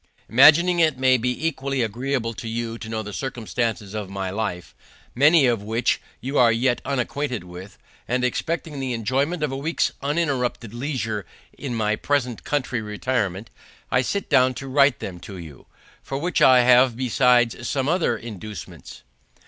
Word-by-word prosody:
Imagining 160 +8 +6
it 155 -5 +3
may 130 0 +4
be 125 +5 -1
equally 135 -4 -1
agreeable 120 +1 -2
to 120 0 -7
you 115 0 -4
to 110 - -8
know 110 -1 -3
the 105 0 -8
circumstances 115 -4 -3
of 105 -3 -5
my 95 -1 -4
life, 95 -4 -4 0.4
many 145 +3 +5
of 120 -4 +1
which 110 +3 0 0.2
you 135 +3 -1
are 120 -2 +6
yet 120 +2 +1
unacquainted 135 -2 -2
with, 90 +2 -11 0.3
and 125 +1 0
expecting 155 +3 -2
the 130 -2 -2
enjoyment 135 +9 -1
of 150 - 0
a - - -3
week's 160 +4 0
uninterrupted 135 -7 -1
leisure 120 - -3 0.3
in 130 -4 -5
my 110 -1 +1
present 125 -3 -1
country 130 -5 -1
retirement, 105 -2 -2 0.4
I 125 - +3
sit 200 +10 -2
down 130 0 +3
to 135 +3 -7
write 140 0 +3
them 90 -2 -6
for 95 +1 -9
you. 80 -7 -11 0.4
To 135 - -3
which 175 +5 -1
I 130 -1 +7
have 125 -1 +5
besides 120 -1 +2
some 135 -1 -1
other 160 -8 +1
inducements. 110 -2 -9
125 Hz, 165 wpm, -23 LUFS, 110-135 Hz, 0.4 s, I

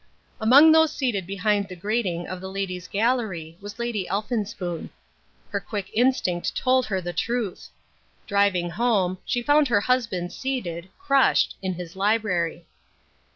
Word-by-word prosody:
Among 270 +8 +7
those 320 -1 +5
seated 240 - -2
behind 200 +1 0
the 185 - -8
grating 185 -2 -2
of 185 -1 -6
the 190 - -6
Ladies' 185 -2 -4
Gallery 200 -8 -1
was 205 +1 -9
Lady 235 -5 -2
Elphinspoon. 200 -4 -3 0.6
Her - - -1
quick 200 -3 -6
instinct 225 -8 +1
told 255 0 +2
her 190 -3 -1
the 175 0 -5
truth. 225 +1 -3 0.6
Driving 200 -4 +1
home, 195 -5 +1
she 240 - -1
found 290 +2 +4
her 205 -5 +2
husband 225 -8 -1
seated, 190 -10 -4
crushed, 275 -8 +3
in 190 -2 -2
his 175 -1 -8
library. 190 -5 0
200 Hz, 140 wpm, -24 LUFS, 180-240 Hz, 0.6 s, Among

